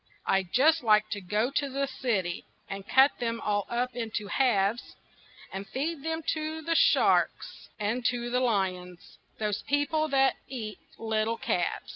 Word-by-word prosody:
I'd 190 -2 +1
just 315 +5 +4
like 215 -2 +4
to 205 - -3
go 210 +7 0
to 280 0 -1
the 275 +1 -1
city 225 -10 -2 0.2
And 195 0 -7
cut 270 +2 +6
them 230 -1 -2
all 205 -2 -1
up 245 +1 -1
into 225 -3 -3
halves 230 -3 +1 0.6
And 195 +1 -5
feed 295 +3 -3
them 320 0 -2
to 315 0 -4
sharks - - +2
and 220 +4 -1
to 240 -1 0
lions 185 -6 -2 0.2
Those 210 -1 -2
people 290 +2 0
that 270 -2 +3
eat 215 -6 -6 0.2
little 220 0 -1
calves. 175 -5 -2
230 Hz, 145 wpm, -28 LUFS, 205-270 Hz, 0.6 s, cut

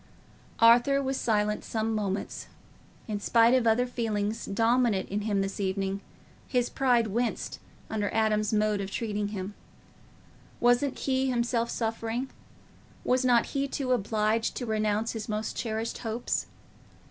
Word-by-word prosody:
Arthur 240 +4 +6
was 270 -1 -1
silent 210 -3 0
some 220 0 -2
moments. 200 -2 -3 0.6
In 210 -2 -2
spite 230 +3 +4
of 255 -3 +3
other 230 +3 +4
feelings 220 -3 -2
dominant 225 -1 +2
in 205 +2 -1
him 205 -2 0
this 195 +1 -3
evening, 195 0 -1 0.5
his 245 -2 0
pride 245 -4 +3
winced 230 +3 -2 0.3
under 210 -2 -2
Adam's 215 -1 +1
mode 210 -1 +1
of 195 - -4
treating 210 -1 -2
him. 200 -1 -5 1.1
Wasn't 245 +3 +3
he 265 0 0
himself 235 -1 0
suffering? 230 +3 -2 0.7
Was 255 +1 +2
not 245 -2 +4
he 275 -1 0
too 270 -1 -2
obliged 220 -1 +1
to 245 - -3
renounce 215 0 0
his 225 0 -6
most 215 +1 -2
cherished 225 0 -3
hopes? 230 +1 -2
225 Hz, 135 wpm, -28 LUFS, 210-245 Hz, 1.1 s, Arthur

